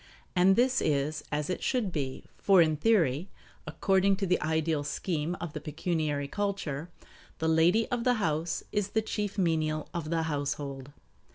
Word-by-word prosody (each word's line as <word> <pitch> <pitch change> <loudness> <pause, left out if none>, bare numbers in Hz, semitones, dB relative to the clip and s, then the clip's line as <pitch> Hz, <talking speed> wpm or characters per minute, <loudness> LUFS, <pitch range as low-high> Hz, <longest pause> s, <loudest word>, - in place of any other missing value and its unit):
And 185 +2 +5
this 255 +3 +3
is 150 +1 0
as 150 0 -1
it 185 - -3
should 240 -7 0
be; 135 -5 -3 0.2
for 195 -2 +5
in 155 -2 +4
theory, 170 - +2 0.4
according 195 +5 +2
to 195 +1 -2
the 180 -1 +1
ideal 160 -1 0
scheme 160 +3 -2
of 170 -3 -5
the 150 - -5
pecuniary 150 -2 -2
culture, 180 -5 -3 0.5
the 160 - -1
lady 165 +8 +4
of 240 -1 0
the 250 0 +3
house 165 -5 -1
is 205 -2 0
the 220 +1 0
chief 210 -2 -3
menial 155 -4 0
of 165 -3 -4
the 165 0 0
household. 145 -3 -3
165 Hz, 165 wpm, -29 LUFS, 150-195 Hz, 0.5 s, And